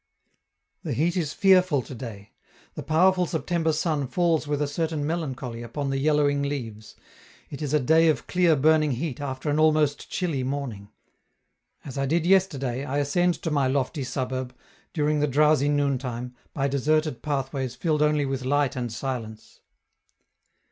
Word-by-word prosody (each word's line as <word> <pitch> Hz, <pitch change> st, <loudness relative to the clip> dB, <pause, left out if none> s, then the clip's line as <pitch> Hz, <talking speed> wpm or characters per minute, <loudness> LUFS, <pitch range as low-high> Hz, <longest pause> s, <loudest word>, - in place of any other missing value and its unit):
The -, -, -3 dB
heat 170 Hz, +5 st, +1 dB
is 160 Hz, -5 st, -1 dB
fearful 185 Hz, -7 st, +4 dB
to -, -, -9 dB
day: 115 Hz, -5 st, -9 dB, 0.4 s
the -, -, -6 dB
powerful 180 Hz, +3 st, +3 dB
September 165 Hz, -1 st, 0 dB
sun 155 Hz, -3 st, -1 dB
falls 165 Hz, +2 st, +1 dB
with 145 Hz, -1 st, -1 dB
a 150 Hz, -, 0 dB
certain 155 Hz, 0 st, -2 dB
melancholy 135 Hz, -7 st, -4 dB
upon 135 Hz, +4 st, -4 dB
the 135 Hz, -, -1 dB
yellowing 145 Hz, -1 st, +2 dB
leaves; 115 Hz, -7 st, -5 dB, 0.6 s
it 140 Hz, -, -7 dB
is 145 Hz, -3 st, -2 dB
a 150 Hz, -, +3 dB
day 160 Hz, +5 st, +4 dB
of 155 Hz, -, +1 dB
clear 175 Hz, -3 st, +3 dB
burning 155 Hz, 0 st, +3 dB
heat 140 Hz, +1 st, -4 dB
after 130 Hz, 0 st, -5 dB
an 150 Hz, -, +1 dB
almost 155 Hz, -2 st, +2 dB
chilly 165 Hz, -8 st, -2 dB
morning. 130 Hz, -7 st, -4 dB, 1.0 s
As 135 Hz, 0 st, -6 dB
I 135 Hz, -, 0 dB
did 165 Hz, +3 st, +1 dB
yesterday, 140 Hz, -9 st, +1 dB
I 140 Hz, 0 st, -3 dB
ascend 175 Hz, +5 st, +1 dB
to 165 Hz, -, -1 dB
my 140 Hz, -3 st, +2 dB
lofty 135 Hz, +2 st, -1 dB
suburb, 130 Hz, 0 st, -4 dB, 0.4 s
during 150 Hz, -2 st, 0 dB
the 150 Hz, -, +2 dB
drowsy 150 Hz, 0 st, +3 dB
noontime, 130 Hz, -4 st, -1 dB, 0.2 s
by 140 Hz, -1 st, -1 dB
deserted 145 Hz, -1 st, 0 dB
pathways 135 Hz, -3 st, -3 dB
filled 155 Hz, -3 st, 0 dB
only 150 Hz, -1 st, +2 dB
with 135 Hz, -1 st, -3 dB
light 140 Hz, +1 st, +1 dB
and 120 Hz, -2 st, -3 dB
silence. 115 Hz, -3 st, -6 dB
145 Hz, 160 wpm, -25 LUFS, 130-155 Hz, 1.0 s, fearful